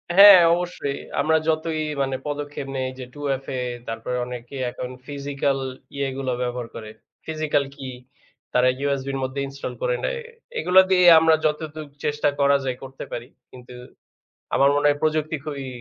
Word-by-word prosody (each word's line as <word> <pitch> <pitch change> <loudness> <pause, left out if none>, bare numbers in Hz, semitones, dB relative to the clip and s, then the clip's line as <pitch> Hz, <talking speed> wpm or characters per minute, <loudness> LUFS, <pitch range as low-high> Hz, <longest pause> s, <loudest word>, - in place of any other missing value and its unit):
হ্যাঁ, 200 -1 +11
অবশ্যই। 175 -5 -2 0.2
আমরা 160 +1 +3
যতই 160 0 0 0.2
মানে 135 -1 0
পদক্ষেপ 145 -1 -4
নেই 130 -1 -1
যে 130 - -5
2FA 135 -3 -3 0.3
তারপরে 115 +2 -3
অনেকে 125 +2 -8 0.2
এখন 125 0 -6 0.2
physical 140 -1 -1 0.4
ইয়েগুলো 135 -1 -2
ব্যবহার 125 -1 -3
করে। 110 -2 -7 0.4
Physical 155 -2 0
key 135 -3 -7 0.6
তারা 125 +1 +4 0.2
USB 140 -1 -1
র - - -1
মধ্যে 130 +2 -3
install 140 0 -6
করে - - +1
নেয়। - - -2 0.4
এগুলা 185 +1 +6
দিয়ে 180 -1 +5
আমরা 160 0 +5
যতটুকু 155 -1 -2
চেষ্টা 150 0 +1
করা 140 0 +5
যায় 125 -1 -2
করতে 135 0 -8
পারি। 120 +1 -5 0.2
কিন্তু 125 0 -13 0.8
আমার 140 +1 +5
মনে 145 0 +2
হয় 145 0 +2
প্রযুক্তি 155 0 +1
খুবই 140 -3 -5
140 Hz, 150 wpm, -23 LUFS, 130-155 Hz, 0.8 s, হ্যাঁ